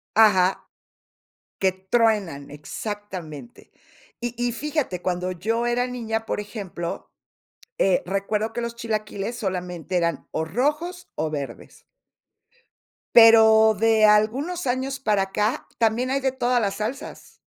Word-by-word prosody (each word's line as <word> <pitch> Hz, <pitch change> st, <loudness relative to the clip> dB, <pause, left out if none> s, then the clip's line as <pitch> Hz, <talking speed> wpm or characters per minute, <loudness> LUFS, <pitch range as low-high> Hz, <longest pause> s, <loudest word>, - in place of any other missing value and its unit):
Ajá. 195 Hz, -4 st, +4 dB, 0.9 s
Que 190 Hz, -1 st, +2 dB
truenan, 190 Hz, -6 st, 0 dB
exactamente. 185 Hz, +4 st, -7 dB, 0.5 s
Y 240 Hz, 0 st, -3 dB
y 245 Hz, 0 st, -1 dB
fíjate, 275 Hz, -, -2 dB
cuando 180 Hz, 0 st, -1 dB
yo 225 Hz, +6 st, -1 dB
era 245 Hz, +1 st, +1 dB
niña, 225 Hz, -3 st, -3 dB
por -, -, -2 dB
ejemplo, 200 Hz, -5 st, -6 dB, 0.7 s
eh, 190 Hz, -2 st, +3 dB
recuerdo 205 Hz, +3 st, -1 dB
que 240 Hz, -, -3 dB
los 235 Hz, 0 st, -4 dB
chilaquiles 215 Hz, 0 st, -3 dB
solamente 180 Hz, -3 st, -3 dB
eran 170 Hz, -4 st, -1 dB
o 160 Hz, -, -2 dB
rojos 300 Hz, -, -2 dB
o 155 Hz, +1 st, -1 dB
verdes. 145 Hz, -3 st, -7 dB, 1.3 s
Pero 220 Hz, -1 st, +8 dB
de 220 Hz, -1 st, +4 dB
algunos 260 Hz, +11 st, +2 dB
años 265 Hz, +2 st, -1 dB
para 210 Hz, -6 st, +1 dB
acá, 210 Hz, +4 st, -1 dB
también 230 Hz, +3 st, +1 dB
hay 275 Hz, -, +1 dB
de 265 Hz, -1 st, +1 dB
todas 250 Hz, -2 st, +1 dB
las 200 Hz, -2 st, -1 dB
salsas. 245 Hz, +8 st, -6 dB
220 Hz, 125 wpm, -24 LUFS, 190-240 Hz, 1.3 s, Pero